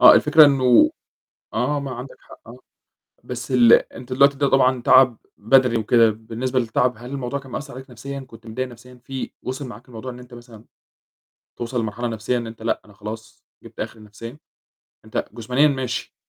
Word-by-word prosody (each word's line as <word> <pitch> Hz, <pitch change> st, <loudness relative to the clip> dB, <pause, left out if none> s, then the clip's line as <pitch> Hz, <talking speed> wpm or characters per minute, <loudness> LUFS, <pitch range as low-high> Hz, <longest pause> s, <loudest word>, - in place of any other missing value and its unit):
آه، -, -, +10 dB
الفكرة 155 Hz, +1 st, +7 dB
إنه 130 Hz, -4 st, +5 dB, 0.6 s
آه، 130 Hz, +6 st, 0 dB
ما 140 Hz, -1 st, -5 dB
عندك 125 Hz, +2 st, -9 dB
حق -, -, -16 dB
آه، 120 Hz, +2 st, -11 dB, 0.7 s
بس 125 Hz, 0 st, -7 dB
ال 120 Hz, -2 st, +6 dB
أنت 125 Hz, +1 st, 0 dB
دلوقتي 140 Hz, +2 st, +4 dB
ده 140 Hz, 0 st, +2 dB
طبعًا 130 Hz, -1 st, +3 dB
تعب 130 Hz, -1 st, +5 dB, 0.2 s
بَدَني 125 Hz, +2 st, +3 dB
وكده، 115 Hz, +1 st, +4 dB
بالنسبة 115 Hz, +4 st, -3 dB
للتعب 125 Hz, +1 st, +1 dB
هل 120 Hz, +2 st, -10 dB
الموضوع 140 Hz, 0 st, -3 dB
كان 135 Hz, -2 st, -14 dB
مأثّر 140 Hz, +3 st, -6 dB
عليك 130 Hz, +1 st, -10 dB
نفسيًا، 135 Hz, +3 st, -7 dB
كنت 115 Hz, -3 st, -14 dB
متضايق 130 Hz, +4 st, -3 dB
نفسيًا 125 Hz, +1 st, -14 dB
في 135 Hz, 0 st, -6 dB
وصل 130 Hz, +2 st, -5 dB
معاك 120 Hz, -1 st, -12 dB
الموضوع 125 Hz, +1 st, -8 dB
إن 125 Hz, -, -11 dB
أنت 125 Hz, 0 st, -14 dB
مثلًا 120 Hz, -2 st, -13 dB, 0.9 s
توصل 120 Hz, +1 st, -3 dB
لمرحلة 115 Hz, +2 st, -3 dB
نفسيًا 115 Hz, +2 st, -2 dB
إن 115 Hz, -, -5 dB
أنت 110 Hz, 0 st, -10 dB
لأ 115 Hz, -, -1 dB
أنا 105 Hz, -, -18 dB
خلاص 110 Hz, +2 st, -9 dB, 0.2 s
جِبت -, -, -12 dB
آخري 110 Hz, -, -6 dB
نفسيًا؟ 115 Hz, +5 st, -10 dB, 0.7 s
أنت 110 Hz, -, -3 dB
جسمانيًا 125 Hz, +6 st, +2 dB
ماشي، 130 Hz, -3 st, -3 dB
125 Hz, 180 wpm, -22 LUFS, 115-130 Hz, 0.9 s, آه